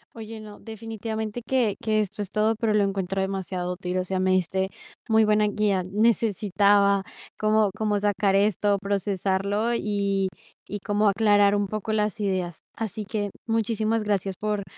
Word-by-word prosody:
Oye, 220 -1 -8
no, 210 -1 -11
definitivamente 220 0 -5
que 230 -3 +1
que 215 -1 +2
esto 210 0 -4
es 200 - -5
todo, 215 +1 +2
pero 220 -2 +1
lo 210 -1 +4
encuentro 195 -1 -1
demasiado 190 -2 -3
útil. 180 0 -3
O 185 - +1
sea, 185 0 -2
me 185 0 +2
diste 190 +1 +1 0.4
muy 220 -1 +4
buena 210 0 +3
guía. 205 -3 +1
Necesitaba 200 -1 +3 0.4
cómo 215 -1 +3
cómo 210 -1 0
sacar 200 -1 +1
esto, 205 0 +2
procesarlo 200 +2 0
y 200 -3 0 0.4
y 205 - -5
cómo 205 +1 +1
aclarar 205 0 +4
un 205 -1 0
poco 215 +1 -3
las 215 +1 0
ideas. 185 -4 -2 0.2
Así 215 -1 -4
que 205 0 -2 0.2
muchísimas 225 0 0
gracias 195 -2 -1
por 210 0 -2
205 Hz, 160 wpm, -25 LUFS, 195-215 Hz, 0.4 s, lo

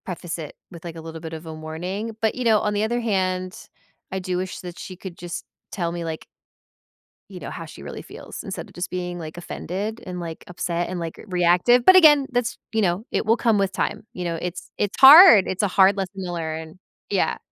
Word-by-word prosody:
Preface 175 -2 -5
it 155 -3 -8 0.2
with, 170 -2 -11
like, 170 -1 -7
a 165 - -8
little 160 0 -8
bit 165 -1 -7
of 160 +1 -8
a 160 - -7
warning, 180 +8 -5
but, 220 -1 +2
you 255 - -4
know, 225 -2 +5
on 210 0 -1
the 205 +1 0
other 240 +2 0
hand, 185 -4 -2 0.4
I 190 - -2
do 185 -1 -2
wish 185 0 -4
that 175 -1 -9
she 185 - -8
could 185 -1 -9
just 175 -1 -6 0.3
tell 170 -3 -2
me, 170 0 -4
like 160 -1 -6 1.0
you - - -9
know, - - -7
how - - -7
she - - -12
really - - -7
feels - - -10
instead - - -6
of - - -18
just 175 +1 -4
being, 180 -1 -4
like, 160 0 -8
offended 200 +6 -5
and, 180 -1 -6
like, 165 -2 -7
upset 175 -1 -3
and, 185 -1 -4
like, 165 -1 -5
r - - -12
reactive, 180 +7 +3
but, 375 - +9
again, 295 -6 +7
that's 245 -1 -1 0.2
you 220 - +2
know, 185 +2 0
it - - -1
will 225 +2 +3
come 230 -3 +2
with 195 -2 +1
time, - - -2
you 180 - -5
know, 170 -1 -2
it's 180 0 -6
it's 205 -1 -1
hard, 275 - +10
it's 190 +3 -2
a - - +3
hard 190 +1 +5
lesson 195 0 -4
to 175 - -4
learn, 160 0 -5 0.3
yeah. - - +1
185 Hz, 235 wpm, -23 LUFS, 170-210 Hz, 1.0 s, hard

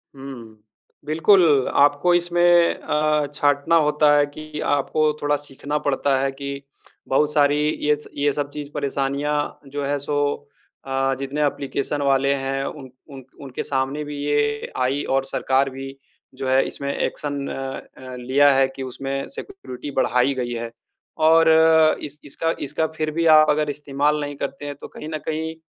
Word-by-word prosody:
हुँ। 120 -5 -10 0.5
बिल्कुल, 155 -3 +4
आपको 145 +5 +4
इसमें 175 0 +1 0.3
अ, 150 -1 0
छाँटना 145 +3 +2
होता 150 0 +3
है 145 - +4
कि 150 +1 -9
आपको 150 +2 +1
थोड़ा 145 0 +2
सीखना 145 +1 -4
पड़ता 140 -1 +1
है 135 0 0
कि 140 0 -6 0.5
बहुत 150 +3 +2
सारी 145 -1 +4 0.3
ये 150 0 +4
स 150 - -10
ये 145 0 +2
सब 145 0 -3
चीज़ 145 -1 -7
परेशानियाँ 140 +1 -2
जो 145 +1 -4
है 145 +1 0
सो, 145 0 -2 0.4
आ 135 0 0
जितने 145 +2 -1
एप्लीकेशन 140 +1 -2
वाले 140 0 +2
हैं 135 0 -2
उन 135 -3 -7 0.2
उन 135 -1 -10 0.2
उनके 135 -3 -5
सामने 135 +2 -2
भी 145 -1 -7
ये 145 0 0
आई 135 +3 0
और 135 0 +1
सरकार 135 0 +1
भी 135 +1 -8 0.4
जो 130 - -4
है 130 +1 +4
इसमें 140 0 -4
एक्शन 145 -1 -3
अ - - -5 0.4
अ, 130 -1 -9
लिया 135 +4 +4
है 135 0 +3
कि 135 - -5
उसमें 135 +2 -4
सिक्योरिटी 145 - -8
बढ़ाई 125 +3 +2
गई 125 -2 -3
है। 115 0 -5 0.5
और 165 +1 +6 0.5
इस 150 +1 -7
इसका 165 +3 -2
इसका 150 +3 -1
फ़िर 155 -1 -1
भी 165 0 +1
आप 155 - +4
अगर 150 0 +1
इस्तेमाल 145 +1 -1
नहीं 145 0 -4
करते 140 +1 -5
हैं, 145 0 -5
तो - - -10
कहीं 150 - -9
न 155 - -3
कहीं 160 +1 -3
145 Hz, 165 wpm, -22 LUFS, 135-150 Hz, 0.5 s, और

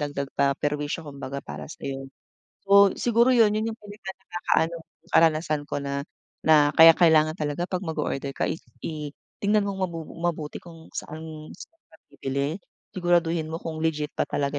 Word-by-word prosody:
dagdag 145 -2 -3
pa 140 0 +3
perwisyo 150 +2 -2
kumbaga 140 -1 -6
para - - -7
sa'yo. 135 -2 -6 0.6
Oo, 200 -1 +8
siguro 235 +2 +4
yun, 225 -3 +6
yun 220 +1 0
yung 220 - -10
pinaka-nakakaano, 190 -5 -2 0.4
karanasan 155 -2 +3
ko - - -2
na 140 0 -3 0.4
na 150 -2 +6
kaya 165 0 +10
kailangan 155 -3 +5
talaga 150 +2 -2
'pag 185 - -2
mag-order 140 -4 -2
ka - - 0
i - - -2 0.3
i 155 -2 -4 0.3
tignan 210 0 +3
mong 195 -1 -4
mabu 165 -1 -6 0.2
mabuti 160 -3 -2
kung 165 -2 -13
saan 155 0 -7
saan 330 - -13
ka 160 - -19 0.2
bibili. 140 +4 -2 0.4
Siguraduhin 170 -3 +1
mo 165 - -2
kung 160 -1 -5
legit 150 -2 0
ba - - +2
talaga 140 0 -1
160 Hz, 160 wpm, -25 LUFS, 145-175 Hz, 0.6 s, kaya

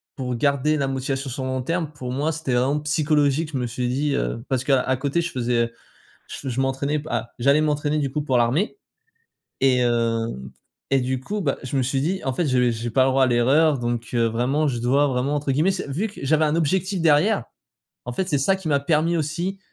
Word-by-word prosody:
pour 125 -3 -3
garder 140 +3 +1
la 135 -2 0
motivation 135 0 -3
sur 130 +2 -5
le 130 - -3
long 130 0 -1
terme, 165 +2 -2
pour 130 -4 -6
moi, 145 +5 0
c'était 150 -5 -3
vraiment 135 +4 +2
psychologique. 150 0 +1
Je - - -1
me 125 -1 -1
suis 125 +1 -3
dit 140 +3 0
heu - - -2
parce 130 -1 0
qu'à 130 -1 +2
côté 145 +5 0
je 170 - -3
faisais, 125 -1 -1
heu, 115 - -10 0.6
ch 135 -3 -5
je 130 - -1
m'entraînais 135 +3 0
p 150 - -8
ah, 120 0 -2
j'allais 140 +5 +4
m'entraîner, 150 0 0
du 140 -3 -1
coup, 150 +2 -2
pour 130 -4 0
l'armée. 145 - +1 0.8
Et, 130 -2 +4
hem, 115 - 0 0.4
et 135 -1 +3
du 130 0 -2
coup, 205 +9 -4
bah, 140 -7 -1
je 135 +1 -4
me 130 - +2
suis 135 +2 0
dit: 185 +6 -1
«En 135 - 0
fait, 160 +5 -1
je 125 -2 +2
j'ai 115 +1 -3
pas 130 +2 +3
le 135 - +2
droit 135 0 +4
à - - +2
l'erreur 135 +5 +3
donc, 120 -1 -3
heu, 115 -1 +3
vraiment 130 +7 0
"je 120 -3 -2
dois 135 +5 +2
vraiment", 135 +2 0
entre 140 -2 -1
guillemets», 155 +8 +2
c'est 185 -6 -3
vu 195 +11 -1
que 205 - -12
j'avais 155 +2 +3
un 150 +2 +1
objectif 185 +4 0
derrière, 160 - +3 0.6
en 125 - -4
fait, 185 +7 -2
c'est 145 - +2
ça 190 +8 +2
qui 190 -4 -7
m'a 140 -1 +3
permis 160 +3 +1
aussi 175 +6 -2
135 Hz, 235 wpm, -23 LUFS, 125-155 Hz, 0.8 s, j'allais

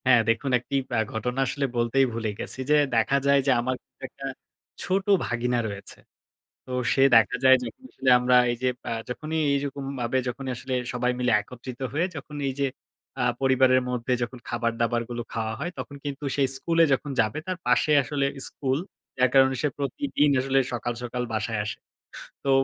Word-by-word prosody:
হ্যাঁ, 125 -2 +6
দেখুন, 125 +4 +1
একটি 130 +3 -5 0.2
আ - - +3
ঘটনা 125 +4 -2
আসলে 140 +3 -1
বলতেই 120 +3 +3
ভুলে 115 -1 -2
গেছি। - - -5
যে 150 - +6 0.2
দেখা 115 +5 +3
যায় 140 0 +5
যে - - +5
আমার 130 +2 -1 0.3
একটা 135 +2 -10 0.6
ছোট 190 +1 0 0.2
ভাগিনা 120 0 0
রয়েছে। 100 -1 -8 0.7
তো 130 - -10 0.2
সে 135 - +2
দেখা 115 +1 +5
যায়, 130 0 +8
যখন 190 - -8
আসলে 130 0 0
আমরা 125 0 +3 0.2
এই - - -1
যে, 130 - +3 0.2
আ - - -2 0.2
যখনই 155 +5 -3 0.2
এইরকমভাবে, 135 -3 -2
যখনই 130 +1 -4
আসলে 125 +2 -5 0.2
সবাই 125 0 +1
মিলে 125 -1 +2
একত্রিত 125 +3 -9
হয়ে, 160 +4 +1
যখন 145 0 -8
এই 135 - -1
যে 140 - +2 0.5
আ - - +2 0.2
পরিবারের 130 -1 +4
মধ্যে 125 0 -1
যখন 125 +1 -6
খাবার 120 0 0
দাবারগুলো 120 0 -1
খাওয়া 110 -1 -2
হয়, 170 +5 -3
তখন 145 - -6
কিন্তু 145 0 -5
সে 145 - 0
স্কুলে 165 +4 +2
যখন 140 +2 -2
যাবে, 110 +4 +2
তার 185 -1 -2
পাশে 125 +5 +3
আসলে 140 0 -1 0.2
স্কুল। 135 -1 -1 0.4
যার 130 0 +5
কারণে 135 0 +5
সে 150 - +2
প্রতিদিন 145 - 0
আসলে 135 +1 +2
সকাল, 120 0 -2
সকাল 125 0 -3
বাসায় 110 0 -1
আসে। 105 - -4 0.7
তো 140 - -1
130 Hz, 180 wpm, -26 LUFS, 120-140 Hz, 0.7 s, যায়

